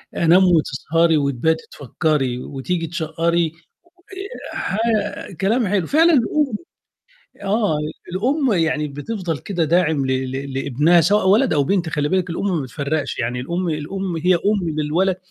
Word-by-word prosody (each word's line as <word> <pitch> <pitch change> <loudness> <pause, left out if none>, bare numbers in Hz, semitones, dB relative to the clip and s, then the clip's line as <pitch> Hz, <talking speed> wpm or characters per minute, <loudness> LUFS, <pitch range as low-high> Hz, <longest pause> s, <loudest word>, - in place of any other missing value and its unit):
أنام 170 +3 +5
وتسهري 165 -1 +2
وتباتي 145 +3 0
تفكري 140 -2 -1
وتيجي 165 +6 -3
تشقّري 165 0 0 1.0
آآ - - -5
ح 195 - -2 0.6
كلام 220 +4 +2
حلو، 190 -4 0
فعلًا 330 +3 +4
الأم 270 -2 +1 1.0
آه، 205 -8 +1 0.3
الأم 260 - +1
يعني 160 -4 0
بتفضل 165 +3 -4
كده 175 -2 -2
داعم 160 -4 +2
ل - - -1 0.2
ل 135 +1 -5
لابنها 145 +6 +3
سوتء 195 +4 +2
ولد 225 +7 +4
أو 145 -2 +2
بنت، 175 +1 0
خلّي 150 -2 -1
بالِك 185 0 0
الأم 170 +4 -2
ما - - -2
بتفرّقش، 140 +3 -3
يعني 125 +2 -2
الأم 170 +7 -2
الأم 170 +4 -3
هي 180 +3 +3
أم 195 0 0
للولد 175 +5 +1
170 Hz, 140 wpm, -20 LUFS, 150-190 Hz, 1.0 s, أنام